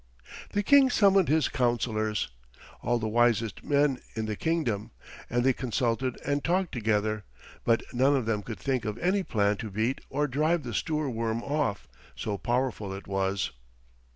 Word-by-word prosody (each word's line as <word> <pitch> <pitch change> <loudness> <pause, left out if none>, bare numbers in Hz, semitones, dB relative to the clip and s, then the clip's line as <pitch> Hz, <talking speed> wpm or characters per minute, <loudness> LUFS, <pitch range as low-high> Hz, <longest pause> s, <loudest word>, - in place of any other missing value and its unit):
The 205 - +1
King 275 +4 +6
summoned 195 - +4
his 155 -1 +3
councillors, 115 - 0 0.5
all 120 +1 +1
the 110 -1 -2
wisest 115 -1 +2
men 145 -2 +2 0.2
in 110 -1 -2
the 110 -1 -2
kingdom, 125 -9 -1 0.4
and 120 +1 +1
they 130 0 +4
consulted 125 0 -1
and 145 0 0
talked 180 +1 +1
together, 110 -3 0 0.4
but 115 -1 +2
none 135 +3 +4
of 130 -4 0
them 110 -2 0
could 110 +1 -7
think 130 +6 -1
of 105 +1 -3
any 185 +7 +1
plan 105 - +1
to 110 -1 -5
beat 110 +6 -1
or 150 0 0
drive 155 +4 +1
the 120 - -5
Stoorworm 115 -5 -1
off, 140 -8 -1 0.3
so 100 -2 -3
powerful 120 -5 -1
it 100 - -9
was. 95 0 -1
120 Hz, 160 wpm, -28 LUFS, 110-145 Hz, 0.5 s, King